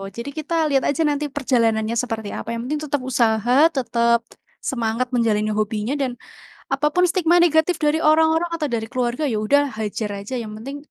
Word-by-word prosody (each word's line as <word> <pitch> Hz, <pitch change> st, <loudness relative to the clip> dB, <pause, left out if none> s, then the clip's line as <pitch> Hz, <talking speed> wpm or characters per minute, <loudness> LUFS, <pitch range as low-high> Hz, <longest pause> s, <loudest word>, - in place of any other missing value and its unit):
oh, 195 Hz, -, -6 dB
jadi 235 Hz, +8 st, -7 dB
kita 310 Hz, +2 st, -4 dB, 0.2 s
lihat 270 Hz, -, +2 dB
aja 285 Hz, +3 st, 0 dB
nanti 295 Hz, 0 st, 0 dB
perjalanannya 230 Hz, -6 st, 0 dB
seperti 225 Hz, -4 st, -4 dB
apa, -, -, -7 dB
yang 230 Hz, -, -4 dB
penting 295 Hz, +4 st, -2 dB
tetap 290 Hz, 0 st, 0 dB
usaha 235 Hz, -1 st, +2 dB, 0.2 s
tetap 235 Hz, -2 st, +2 dB, 0.4 s
semangat 235 Hz, 0 st, -1 dB
menjalani 215 Hz, -3 st, +1 dB
hobinya 215 Hz, +2 st, -1 dB
dan, 260 Hz, -3 st, -1 dB, 0.6 s
apa 300 Hz, -, +1 dB
pun 360 Hz, -, +4 dB
stigma 345 Hz, -1 st, +2 dB
negatif 340 Hz, +1 st, +3 dB
dari 300 Hz, 0 st, +2 dB
orang-orang 320 Hz, +2 st, +3 dB
atau 305 Hz, -3 st, -2 dB
dari 225 Hz, -1 st, -2 dB
keluarga, 250 Hz, +2 st, -2 dB
ya 230 Hz, -7 st, 0 dB
udah 285 Hz, +7 st, +3 dB, 0.2 s
hajar 210 Hz, 0 st, -3 dB
aja 200 Hz, +6 st, -7 dB
yang 215 Hz, -1 st, -8 dB
penting, 275 Hz, +4 st, -6 dB
250 Hz, 180 wpm, -21 LUFS, 225-300 Hz, 0.6 s, pun